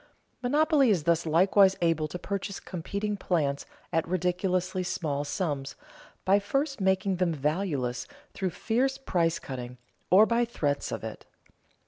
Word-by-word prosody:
Monopoly 290 +1 +3
is 185 -8 +2
thus 170 0 +1
likewise 190 +4 +5
able 165 -3 +1
to 165 - -6
purchase 200 +2 -4
competing 200 +4 -4
plants 150 -8 -1 0.3
at 165 0 +1
ridiculously 185 +1 0
small 160 -6 -2
sums, 145 -4 -3 0.5
by 195 +2 +5
first 275 +5 -1
making 190 0 +1
them 180 -1 +1
valueless 145 -5 -1 0.3
through 190 - -1
fierce 250 +9 0
price 170 -9 0
cutting, 125 -2 -7 0.3
or 200 +4 +7
by 235 +1 +2
threats 145 -12 -1
of - - -4
it. - - -7
185 Hz, 135 wpm, -28 LUFS, 160-200 Hz, 0.5 s, or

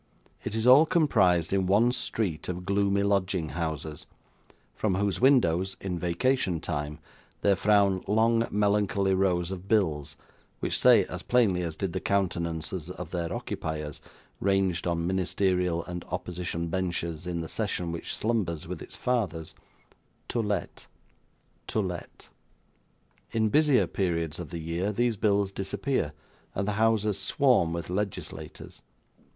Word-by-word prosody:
It - - -4
is 110 0 0
all 135 +6 +8
comprised 95 - +3
in 95 -2 +2
one 110 +6 +4
street 95 -10 -2
of 90 0 -4
gloomy 100 +1 +2
lodging 95 -5 +1
houses, 80 -2 -4 0.7
from 100 -4 0
whose 100 -1 0
windows, 95 -9 +3
in 90 -3 -3
vacation 90 +1 +1
time, 75 -1 -3 0.4
there 100 -1 +4
frown 100 -1 +3
long 115 +2 +3
melancholy 100 -1 +2
rows 90 -2 +1
of 95 0 -6
bills, 80 -10 +1 0.4
which - - -1
say, - - +6
as - - -6
plainly 110 -8 +2
as 85 -3 -3
did 95 0 -3
the - - -1
countenances 85 -3 -1
of 90 -2 -7
their 85 -2 -2
occupiers, 75 -2 -4 0.4
ranged 95 -3 +1
on 85 -1 0
ministerial 90 -1 0
and 90 -1 -6
opposition 85 -1 -4
benches 85 -2 -2
in 85 -1 -2
the 80 - -5
session 90 -5 -2
which 85 - -4
slumbers 100 -9 -1
with - - -6
its - - -8
fathers, 95 -11 -1 0.8
'To 120 - -1
Let', 105 -4 -3 0.8
'To - - -1
Let'. 90 -4 -5 1.0
In 110 -1 +1
busier 150 0 +4
periods 85 -4 -2
of - - -6
the 85 - -5
year 85 +5 -2
these 120 +2 +1
bills 100 -1 +1
disappear, 95 - -2 0.4
and 95 +1 -1
the - - +1
houses 110 -3 +2
swarm 125 - +3
with 85 +1 -4
legislators. 100 +1 -5
95 Hz, 140 wpm, -28 LUFS, 85-105 Hz, 1.0 s, all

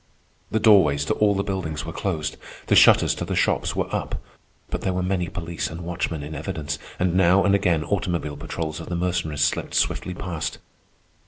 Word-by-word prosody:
The 110 - +1
doorways 85 -10 +5
to - - +1
all 105 -1 +2
the 100 - 0
buildings 85 -7 -3
were 80 - -6
closed; 80 -6 -2 0.3
the - - +3
shutters - - +6
to - - -4
the - - -3
shops - - +1
were - - 0
up. - - -3 0.5
But - - -2
there 95 - -1
were 90 - 0
many 90 -1 0
police 85 -1 -4
and 80 +2 -7
watchmen 85 -3 -3
in 75 +2 -7
evidence, 75 0 -4 0.2
and 90 -1 +1
now 95 +1 +5
and 100 +1 +3
again 90 -6 +2
automobile 85 -6 -2
patrols 80 +2 -4
of 85 - -8
the 90 - -2
Mercenaries 85 -4 -1
slipped 75 - 0
swiftly 90 - 0
past. 90 -4 -4
85 Hz, 190 wpm, -24 LUFS, 80-95 Hz, 0.5 s, shutters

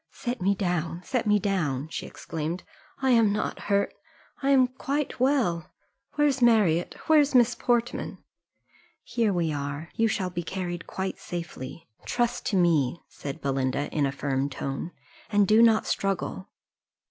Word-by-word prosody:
"Set 245 -4 -4
me 200 +2 +2
down, 175 -3 -1
set 245 0 -1
me 210 0 +5
down," 165 -9 -1
she - - -5
exclaimed: 165 +3 -5 0.4
"I 265 - +4
am 230 -4 +5
not 210 - -2
hurt 200 0 +2 0.5
I 275 - +1
am 265 -2 +6
quite 275 +3 -3
well, 240 - +1 0.5
Where's 290 -3 +2
Marriott? 210 -8 +4
Where's 295 -3 +4
Miss 245 -1 +6
Portman?" 240 0 -1 0.9
"Here 230 -3 +1
we 170 -4 0
are 145 +2 -4
you 225 - +2
shall 190 -4 -1
be 175 0 -3
carried 175 0 -4
quite 190 0 -4
safely 165 -3 -7 0.2
trust 240 0 -1
to 205 - 0
me," 170 -4 +3
said 140 -1 -7
Belinda, 135 0 -1
in 145 -2 +2
a - - -2
firm 140 0 -1
tone, 135 +3 -4 0.4
"and 205 -1 +4
do 215 +3 +6
not 225 -2 +5
struggle." 195 -1 -2
190 Hz, 150 wpm, -27 LUFS, 160-235 Hz, 0.9 s, am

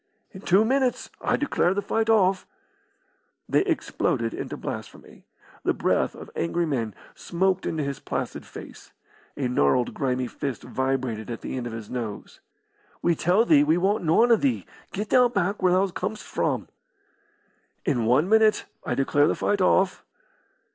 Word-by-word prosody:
"In 190 - -11
two 200 +3 +4
minutes 260 +1 0
I - - +2
declare 195 -10 +1
the 205 - 0
fight 225 +3 0
off." 195 -4 +3 1.0
They - - +3
exploded 135 - -1
into - - -5
blasphemy. - - -8 0.4
The - - +1
breath - - +1
of - - -11
angry 170 +1 0
men 120 -9 -2 0.2
smoked 190 +1 -1
into 155 -2 -1
his 140 -1 -4
placid - - -4
face. - - -12 0.4
A 135 -3 0
gnarled, 120 - +2
grimy 130 -3 -1
fist 135 +1 -5
vibrated 130 -4 -2
at 115 - -5
the - - -5
end 125 -2 -3
of 115 - -7
his 110 -2 -8
nose. 115 -5 -6 0.6
"We 170 - +3
tell 180 +8 +2
thee 150 -7 +6
we 155 +3 +3
want 195 +3 +1
noan 225 +9 +4
o' 230 - +7
thee. 270 -1 0 0.3
Get 210 +2 -4
thou 250 -1 +6
back 200 -2 -1
where 180 -1 +4
thou 185 +2 +4
com'st 200 +4 -4
from." - - -2 1.2
"In 125 -9 +1
one 130 +9 +3
minute 220 +1 +4 0.2
I 125 - -2
declare 145 +2 +3
the - - +1
fight 205 -1 0
off." 185 0 +2
175 Hz, 160 wpm, -25 LUFS, 130-205 Hz, 1.2 s, o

